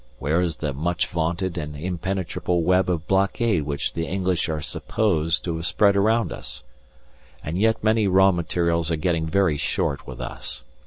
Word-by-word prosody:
Where 80 +5 +1
is 85 -3 -1
the 75 -3 -3
much 85 +5 0
vaunted 85 +2 -2
and 75 -1 -5
impenetrable 90 +1 -2
web 90 +2 +3
of 80 -3 -1
blockade 95 -3 +1
which 70 -2 -2
the 85 0 -2
English 90 -1 0
are 80 -1 -1
supposed 80 0 0
to 85 -2 -2
have 80 - -5
spread 100 -2 +3
around 110 +3 +2
us? - - -8 0.8
And 80 +4 -3
yet 110 +1 +2
many 110 -1 +3
raw 95 +1 +5
materials 85 -1 0
are 85 - +1
getting 80 0 0
very 90 -3 +2
short 70 - -1
with - - -8
us. - - -6
85 Hz, 170 wpm, -24 LUFS, 80-95 Hz, 0.8 s, raw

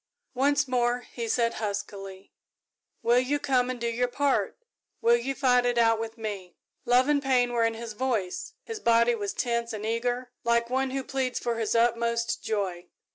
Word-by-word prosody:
"Once 285 +2 +2
more," 245 -1 +1
he 235 -1 -4
said 230 +1 +1
huskily, 200 -2 -5 0.7
"will 240 +1 +4
you 265 +3 0
come 255 -3 +1
and 255 -1 -4
do 235 - -3
your 240 +2 0
part? 275 +2 0 0.4
Will 235 +1 +5
you 255 +3 -2
fight 250 -2 +3
it 245 -1 0
out 225 -1 +4
with 225 +1 -5
me?" 200 -5 -6 0.3
Love 250 +2 +4
and 295 -1 +3
pain 250 -3 +2
were 235 -1 +2
in 230 0 0
his 230 -1 -6
voice 220 -6 -2
his 450 -2 -6
body 235 - +4
was 205 -3 -3
tense 235 -1 -1
and 215 0 -5
eager, 245 +2 -1
like 235 0 +1
one 265 +1 +1
who 270 0 -3
pleads 260 -1 -2
for 235 -1 -2
his 225 0 -1
utmost 235 0 +1
joy. 185 -5 -2
235 Hz, 185 wpm, -27 LUFS, 225-255 Hz, 0.7 s, Will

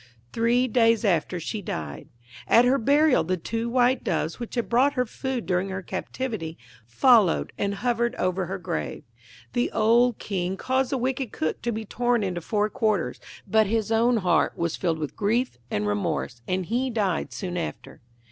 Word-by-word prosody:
Three 235 +2 +2
days 230 -1 +3
after 175 -1 +1
she 210 +6 -4
died. 75 - -6 0.4
At 235 +2 +6
her 265 +2 +3
burial 285 +4 +4
the 185 0 -1
two 225 +7 -3
white 250 +1 +2
Doves 160 +2 -1
which 240 +1 -6
had 240 - -1
brought 260 +4 +3
her 250 -2 0
food 255 +1 -4
during 185 +1 0
her 190 0 -4
captivity, 190 -4 -4 0.3
followed 210 - +4
and 200 0 -1
hovered 235 +1 0
over 185 0 -1
her 190 +2 -3
grave. 80 - -4 0.5
The 245 0 0
old 235 +2 +3
King 190 -1 -3
caused 260 +3 0
the 270 - +1
wicked 260 -1 -2
Cook 155 - -2
to 235 - -1
be 220 0 -4
torn 240 +1 0
into 180 -3 -2
four 210 +4 0
quarters; 215 - -1 0.3
but 220 -1 +3
his 225 +1 -1
own 230 +2 +3
heart 180 -5 +1
was 170 -1 -1
filled 170 -3 -1
with 150 -2 -5
grief 225 - 0
and 105 - -1
remorse, 105 +3 -2
and 185 0 -1
he 245 +7 0
died 195 - -1
soon 175 +9 -5
after. 175 - -6
215 Hz, 175 wpm, -25 LUFS, 180-245 Hz, 0.5 s, At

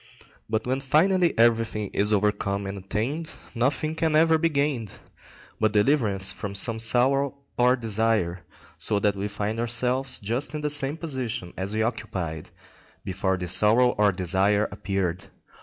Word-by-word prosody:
But 110 0 -1
when 130 +2 -1
finally 170 +6 +2
everything 115 -3 +1
is 105 +1 +1
overcome 100 -1 0
and 95 +1 -5
attained, 120 - -4 0.2
nothing 135 +6 -1
can 160 -1 0
ever 160 0 +4
be 165 +1 +2
gained 140 - -1 0.7
but 110 -1 +1
deliverance 105 -5 +2
from 100 +1 -6
some 110 +3 +3
sorrow 135 +4 +2 0.2
or 125 +1 +4
desire, 110 -6 -1 0.4
so 105 - +1
that 100 0 +1
we 100 +1 -3
find 105 +2 -4
ourselves 125 +3 +1
just 120 +9 -2
in 150 - -4
the 150 0 0
same 145 +1 0
position 130 - -4
as 100 +3 -4
we 110 - +1
occupied 95 -9 -4 0.6
before 95 0 -1
this 90 0 +2
sorrow 115 +5 +4
or 105 -3 +2
desire 95 +3 +1
appeared. 95 -2 -3
110 Hz, 150 wpm, -25 LUFS, 100-135 Hz, 0.7 s, ever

